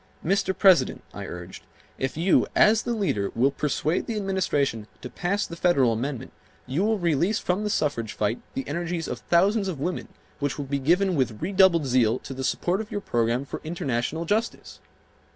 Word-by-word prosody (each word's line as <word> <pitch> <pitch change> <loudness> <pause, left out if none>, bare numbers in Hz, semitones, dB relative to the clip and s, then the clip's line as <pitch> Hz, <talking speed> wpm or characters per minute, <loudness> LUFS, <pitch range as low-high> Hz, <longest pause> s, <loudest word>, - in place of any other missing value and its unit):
"Mr. 190 +1 +1
President," 185 -9 +4
I - - -6
urged, 90 +1 -8 0.4
"if 135 +2 -2
you, 175 +4 +3
as 215 +1 +5
the 240 - -2
leader, 105 - -1
will 130 +4 +3
persuade 150 +4 -1
the 230 - -2
administration 150 - -1 0.2
to - - -7
pass 200 +4 -1
the 170 - -8
Federal 140 -9 +3
Amendment 130 +2 -4 0.3
you 140 +9 -1
will 220 +1 +2
release 175 +3 +1
from 185 +3 -1
the 210 - -1
suffrage 115 - -1
fight 110 +3 -1
the 135 - -3
energies 170 +2 -3
of 125 - -4
thousands 195 - +2
of 175 -7 -4
women 175 +5 -3 0.3
which 145 -2 -2
will 145 - -4
be 140 +1 -2
given 180 +6 +2
with 125 -6 0
redoubled 185 -3 +4
zeal 125 -3 +3
to 135 - -8
the 130 0 -5
support 180 +8 0
of 215 - -9
your 205 - -3
program 120 -2 0
for - - -7
international 155 -1 -2
justice." 220 +6 -2
160 Hz, 185 wpm, -25 LUFS, 130-190 Hz, 0.4 s, as